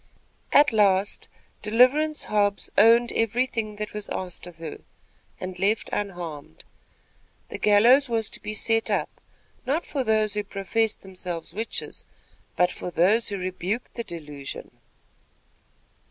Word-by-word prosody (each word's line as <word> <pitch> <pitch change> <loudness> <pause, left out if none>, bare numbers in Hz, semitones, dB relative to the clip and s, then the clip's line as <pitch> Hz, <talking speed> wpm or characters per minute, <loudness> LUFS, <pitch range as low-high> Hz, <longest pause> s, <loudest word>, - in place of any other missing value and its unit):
At 290 -3 +6
last, 200 -2 +2 0.3
"Deliverance 255 +8 +3
Hobbs 205 -1 0
owned 230 +3 +6
every 230 +3 +1
thing 220 -4 -4
that 210 0 -5
was 210 -1 -4
asked 180 -1 -5
of 175 - -11
her," 165 -2 -7 0.6
and 185 -1 -6
left 210 +3 +1
unharmed. 170 - -5 0.9
The - - -6
gallows 240 +7 +5
was 225 -2 +1
to - - -4
be 215 - -4
set 225 +1 +1
up, - - -2 0.4
not 290 +6 -1
for 275 -3 -2
those 215 -2 +2
who 210 0 0
professed 210 +2 -1
themselves 180 -3 -6
witches, 220 +4 -4 0.5
but 180 0 +3
for - - -6
those 195 +7 +3
who 200 - -3
rebuked 185 +5 -3
the 235 - -4
delusion. 150 -7 -8
210 Hz, 135 wpm, -25 LUFS, 185-230 Hz, 0.9 s, At